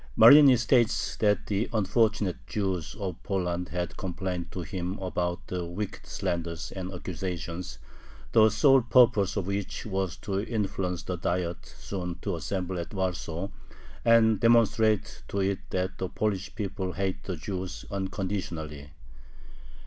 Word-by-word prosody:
Marini 130 +3 +9
states 120 -1 +2
that 105 -1 +2
the 105 +3 -1
"unfortunate 110 -2 +1
Jews" 95 -7 -2
of 95 -4 -4
Poland 90 -2 -2
had 90 0 -3
complained 90 -2 -4
to 90 - -4
him 90 +1 -4
about 90 -1 -2
the 90 -1 -3
"wicked 90 +4 -5
slanders" 85 -1 -3
and 95 -1 -5
accusations, 90 -1 -5 0.5
the 110 -1 +6
"sole 135 +5 +5
purpose" 115 -5 +4
of 100 - -1
which 100 +3 -3
was 95 -4 -2
to 100 -1 -2
influence 95 -6 -2
the 90 - -3
Diet 85 0 -2
soon 90 -3 -6
to 100 -4 -1
assemble 90 +3 -3
at 85 +4 -6
Warsaw, 90 -1 -2 0.5
and 115 -2 +5
demonstrate 110 -2 +3
to 100 - -2
it 95 0 0
that 95 0 -2
"the 95 - -2
Polish 100 -3 -2
people 95 -3 -3
hate 95 -1 -2
the 95 - -3
Jews 95 +2 -5
unconditionally." 95 -7 -4
95 Hz, 135 wpm, -28 LUFS, 90-105 Hz, 0.5 s, Marini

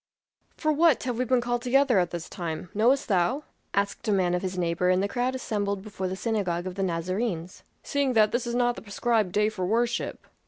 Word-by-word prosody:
"For 310 - +1
what 315 -2 +4
have 245 -2 -2
we 255 - +1
been 250 0 +2
called 240 0 -1
together 255 -3 +3
at 175 -1 +1
this 170 -1 -5
time, 170 0 -5
knowest 245 +7 +3
thou?" 205 - +1 0.3
asked 200 +3 -1
a - - +3
man 185 -3 +2
of 180 - 0
his 185 -1 -4
neighbor 175 +1 +1
in 185 0 +3
the 200 - +1
crowd 250 +4 -1
assembled 200 -5 -2
before 200 -3 -4
the 185 - -3
synagogue 190 -5 -1
of 185 - -4
the 195 - -4
Nazarenes. 185 +1 -2 0.2
"Seeing 280 -2 0
that 215 -2 +4
this 240 0 -1
is 235 - -2
not 245 0 +2
the - - -8
prescribed 215 -1 0
day 210 +2 +2
for 210 -4 -3
worship." 235 +3 -1
210 Hz, 220 wpm, -27 LUFS, 185-245 Hz, 0.3 s, what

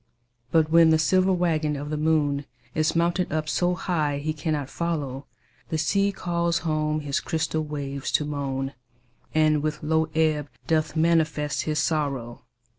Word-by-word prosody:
But 160 -1 +3
when 165 -1 +7
the 160 - +5
silver 185 +5 +3
waggon 160 -4 +1
of 145 +1 -5
the - - 0
moon 150 -2 +1 0.3
Is 155 +1 +1
mounted 170 +2 +1
up 155 0 -1
so 180 +2 +1
high 155 -5 -1
he 155 +2 -2
cannot 150 -2 -2
follow, 145 -4 -3 0.4
The 160 - -1
sea 200 +5 +2
calls 170 -3 0
home 155 -1 0
his 145 -1 -1
crystal 160 -1 -1
waves 140 -2 -4
to 150 - +3
moan, 135 -2 -3 0.6
And 155 -1 +4
with 155 0 -3
low 160 +1 +2
ebb 155 -2 +1 0.2
doth 155 -1 0
manifest 160 -2 +1
his 155 -1 -1
sorrow. 140 -7 -1
155 Hz, 155 wpm, -25 LUFS, 145-165 Hz, 0.6 s, when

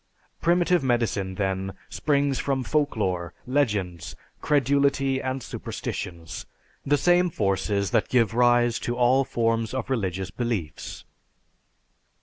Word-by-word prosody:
Primitive 175 -1 +3
medicine, 115 -7 0
then, 95 -1 -2
springs 140 -2 0
from 135 -2 -1
folklore, 105 - -1
legends, 105 - -1 0.3
credulity, 140 -1 +2
and 130 -1 -3
superstitions; 85 -2 -6 0.4
the 145 +1 +2
same 175 +4 +3
forces 100 - 0
that - - +1
give 115 -4 +3
rise 120 0 +3
to 120 0 -3
all 125 +2 +4
forms 115 -1 0
of 130 0 -3
religious 95 -6 -2
beliefs. 110 -9 -4
120 Hz, 110 wpm, -25 LUFS, 95-135 Hz, 0.4 s, all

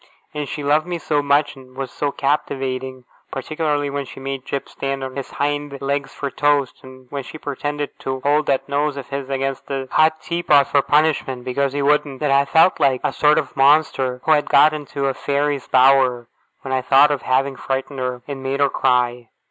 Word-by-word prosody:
And 150 -2 -4
she 150 - -5
loved 150 +4 +2
me 175 -1 -3
so 150 -3 0
much, 145 +1 +1
and 130 -1 -16
was 135 -2 -4
so 145 -1 -2
captivating 130 -2 -2 0.3
(particularly 150 +1 -2
when 140 0 -3
she - - -11
made 135 -1 -5
Jip 140 - -3
stand 135 0 -4
on 130 -1 -6
his 140 -2 -5
hind 145 -1 -3
legs 140 0 -2
for 140 -1 -5
toast, 145 -2 +1
and 130 0 -14
when 140 - -3
she 145 - -10
pretended 145 0 -4
to 130 0 -4
hold 150 +2 +1
that 135 -1 0
nose 145 0 -1
of 135 - -7
his 140 -1 -5
against 135 0 -3
the 135 -1 -4
hot 155 0 +3
teapot 155 -5 +2
for 140 - +3
punishment 145 -4 +1
because 135 +2 -1
he 145 0 -1
wouldn't), 145 -2 +1
that 150 -2 0
I 140 0 +4
felt 160 +6 +4
like 130 -2 +2
a - - 0
sort 150 0 +3
of 150 -4 -2
Monster 135 -3 +2
who - - +1
had 150 -1 +3
got 155 +1 +6
into 145 -2 -4
a 135 - +1
Fairy's 140 0 -1
bower, 130 -2 +4 0.4
when 135 - -5
I 130 0 +1
thought 140 +3 +5
of 145 - -1
having 135 +1 0
frightened 135 +1 -4
her, 125 -1 -3
and 140 -2 -6
made 135 +1 -2
her 140 -1 +3
cry. 125 -3 0
140 Hz, 205 wpm, -20 LUFS, 130-145 Hz, 0.4 s, got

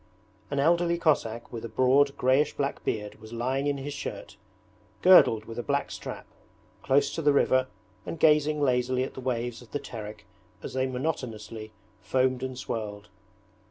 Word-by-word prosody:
An 140 - -1
elderly 170 +3 +3
Cossack 120 -10 0
with 115 - -5
a 115 - -5
broad 135 +5 +3
greyish 130 +4 +2
black 140 0 -2
beard 105 0 -3
was 110 +1 -11
lying 130 +4 -1
in 145 -1 0
his 140 +1 -5
shirt, 140 - -6 0.7
girdled 115 -12 +7
with 115 +1 -7
a - - 0
black 140 +3 -1
strap, - - -7 0.6
close 140 +1 +2
to 165 - -3
the 145 -1 +4
river 130 -2 +3 0.4
and 165 - -6
gazing 150 -1 +4
lazily 125 -1 +1
at 130 - -5
the 130 - -8
waves 120 -2 -2
of 120 - -15
the 145 - -1
Terek 105 -3 -8 0.4
as - - -6
they 130 0 0
monotonously 115 -6 -4 0.3
foamed 130 +6 +1
and 130 -1 -4
swirled. 105 -4 -5
130 Hz, 165 wpm, -27 LUFS, 115-140 Hz, 0.7 s, girdled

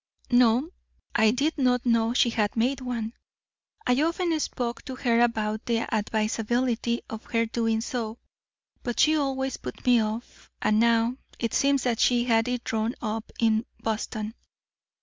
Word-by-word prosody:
"No. 245 +5 +4 0.4
I 220 -1 +4
did 285 +7 0
not 250 -2 +2
know 230 -1 +3
she 240 - +4
had 210 -2 0
made 260 +4 +1
one. 235 -3 -3 0.7
I 250 +3 +3
often 335 0 +1
spoke 240 -5 -3
to 260 - -5
her 235 -2 +2
about 220 -2 0
the 230 -1 +1
advisability 230 +3 0
of 220 0 -8
her 230 -1 +1
doing 225 -1 0
so, 230 -2 -4 0.6
but 240 -2 -4
she 310 +1 +5
always 270 -3 -1
put 125 - -8
me 245 -2 +5
off. 220 +3 -5
And 215 0 +2
now 235 +1 +3 0.2
it 230 -2 -2
seems 275 -1 +2
that 235 -2 0
she 240 -1 +3
had 225 -1 +2
it 245 -1 -2
drawn 225 +2 -1
up 220 0 -4
in 225 0 +2
Boston. 220 0 -3
235 Hz, 155 wpm, -26 LUFS, 225-250 Hz, 0.7 s, she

